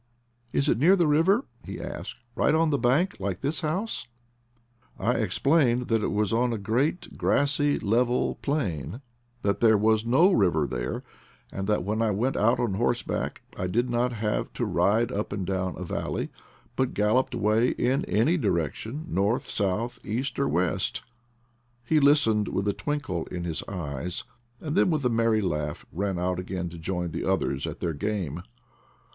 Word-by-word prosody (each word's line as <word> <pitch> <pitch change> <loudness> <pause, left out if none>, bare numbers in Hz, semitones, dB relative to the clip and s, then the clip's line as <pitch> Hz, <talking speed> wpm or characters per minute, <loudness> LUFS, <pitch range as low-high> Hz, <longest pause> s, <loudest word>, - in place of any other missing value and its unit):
"Is 140 - +1
it 115 - +2
near 175 +8 +6
the 175 -3 +3
river,* 165 - +3 0.2
9 - - -5
he - - -7
asked, - - -6
" 120 - -37
right 150 - +3
on 160 -1 +3
the 140 - +1
bank, 135 +10 +2
like 95 -2 -3
this 140 +1 -1
house 180 - -2 0.5
?" 120 0 -38
I 115 +6 +1
explained 125 - +2
that 115 -1 +2
it - - -1
was 105 0 0
on 120 +2 +2
a 115 - -1
great, 120 - -1
grassy, 145 +1 +2
level 120 +4 +1
plain, 115 - -2 0.4
that 100 0 +1
there 110 -2 +5
was 110 +1 +3
no 135 +12 +4
river 85 - +3
there, - - -3 0.5
and 95 0 -3
that 105 -3 +1
when 105 +4 -1
I 115 - +2
went 115 +7 0
out 115 +4 +3
on 120 -5 0
horseback 120 +4 -1
I 90 - -2
did 120 +6 0
not 120 +1 +1
have 105 -1 -1
to - - -1
ride 110 +3 +2
up 105 +1 -3
and 100 -3 -3
down 95 0 -2
a 90 - -5
valley, 85 - -3 0.4
but 130 -1 0
galloped 105 +5 +2
away 110 +3 +2
in 135 +4 +1
any 125 - +2
direction 110 - -2
— - - -17
north, 105 - 0
south, 110 +5 -1
east, 125 +8 -3
or 140 - +2
west. 90 +1 0 0.8
He 155 +5 +3
listened 140 -8 +4
with 100 +1 -1
a 100 - +2
twinkle 145 - -3
in 90 -1 -5
his 85 -2 -2
eyes, 85 -3 -4 0.4
then 160 +4 +1
with 155 -5 0
a - - +4
merry 115 -1 +2
laugh 75 -6 -2
ran 95 +1 -2
out 90 +1 -1
again 90 -1 -4
to 85 0 -10
join 90 0 -3
the - - -3
others 70 0 0
at - - -7
their 85 -2 -1
game. 90 -2 -3
110 Hz, 180 wpm, -27 LUFS, 95-135 Hz, 0.8 s, near